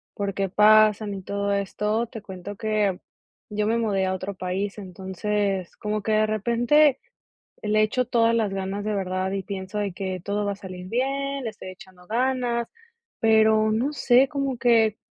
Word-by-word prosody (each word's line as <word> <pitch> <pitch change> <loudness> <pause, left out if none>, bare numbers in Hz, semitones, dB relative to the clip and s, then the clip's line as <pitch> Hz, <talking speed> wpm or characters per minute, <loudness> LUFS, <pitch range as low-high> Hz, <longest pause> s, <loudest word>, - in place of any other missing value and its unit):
por 200 -1 -2
qué 195 -1 -1
pasan 215 0 +5
y 195 - -6
todo 200 +1 -2
esto, 210 +3 -1
te 225 -2 -9
cuento 190 +1 -8
que, 210 -3 0 0.5
yo 210 0 0
me 230 +1 +2
mudé 200 -4 0
a 185 - 0
otro 190 +2 -5
país, 190 +2 -3
entonces 190 0 -3
como 210 0 -2
que 220 - -2
de 215 0 +4
repente 240 +7 +3 0.6
le 215 0 +2
echo 250 +4 +1
todas 230 -1 +2
las 215 -4 +1
ganas 195 +1 -3
de 215 - -1
verdad, 185 -1 -2
y 195 - -2
pienso 190 +1 -5
de 205 -2 -1
que 185 -1 -4
todo 205 +2 -2
va 205 - -1
a - - -5
salir 185 -2 -9
bien, 275 +4 -1
le 225 - -2
estoy 195 -3 -10
echando 185 -2 -15
ganas, 240 +1 0 0.5
pero 220 -1 +4
no 245 +7 0
sé, 260 0 +4
como 275 -3 -2
que, 225 -3 +3
210 Hz, 180 wpm, -24 LUFS, 195-230 Hz, 0.6 s, pasan